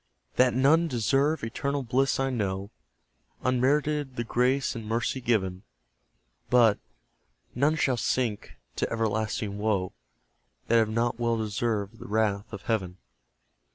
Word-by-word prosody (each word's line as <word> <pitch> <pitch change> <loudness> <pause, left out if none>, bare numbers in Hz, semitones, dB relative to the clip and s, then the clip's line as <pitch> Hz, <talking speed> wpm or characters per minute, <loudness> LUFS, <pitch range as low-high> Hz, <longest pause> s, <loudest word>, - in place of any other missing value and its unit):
That 125 -1 +4
none 155 +6 +4
deserve 135 +4 +1
eternal 140 +5 -2
bliss 130 +3 +1
I 135 0 +1
know; 100 -3 -2 0.7
Unmerited 140 +2 +1
the 120 - -2
grace 125 +4 +1
in 115 - -5
mercy 115 +4 -1
given: 95 -6 0 0.9
But, 115 -4 +5 0.7
none 145 +5 +2
shall 130 -5 +1
sink 115 -3 -1 0.2
to - - -1
everlasting 110 -1 -1
woe, 100 -4 0 0.8
That 115 - +5
have 110 -1 +2
not 115 +2 0
well 115 -1 +1
deserved 110 0 -2
the - - -9
wrath 105 -1 0
of 100 -5 -8
Heaven. 95 -5 -2
115 Hz, 125 wpm, -27 LUFS, 105-130 Hz, 0.9 s, But